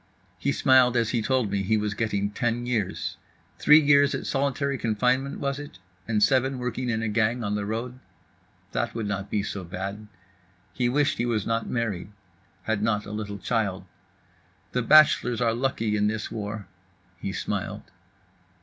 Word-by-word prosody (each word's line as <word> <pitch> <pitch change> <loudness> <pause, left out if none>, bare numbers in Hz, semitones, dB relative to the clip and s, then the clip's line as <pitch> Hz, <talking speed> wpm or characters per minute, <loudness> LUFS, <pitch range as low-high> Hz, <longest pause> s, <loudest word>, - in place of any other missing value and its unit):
He 140 - 0
smiled 130 -2 +4
as 115 -1 +1
he 120 - +1
told 125 -3 0
me 100 -1 0
he 110 +3 +1
was 105 -1 -1
getting 100 -1 -1
ten 120 +2 -1
years. 115 -6 -2 0.4
Three 150 +1 +7
years 145 -1 +4
at - - -5
solitary 140 0 0
confinement 125 +5 0
was 140 0 -2
it, 145 -10 -9 0.3
and 110 -2 +2
seven 130 +4 +3
working 125 0 -3
in 110 -1 -1
a - - 0
gang 115 +3 +1
on 105 -1 -1
the 105 -1 -2
road? 120 +4 -4 0.7
That - - -2
would 115 -2 -2
not 100 -1 -3
be 105 - 0
so 100 -1 -5
bad. 95 +4 -6 0.7
He 125 -1 0
wished 140 0 +1
he 120 - +1
was 110 -4 0
not 115 0 -1
married, 105 -5 -2 0.5
had 110 -2 -1
not 105 -1 0
a 105 - -8
little 105 -1 -4
child. 100 -2 -1 0.9
"The 125 - 0
bachelors 125 -3 +5
are 115 -2 +2
lucky 115 -3 -1
in 105 0 +2
this 110 +1 -3
war"—he 95 -4 -8
smiled. - - -3
115 Hz, 170 wpm, -26 LUFS, 105-125 Hz, 0.9 s, Three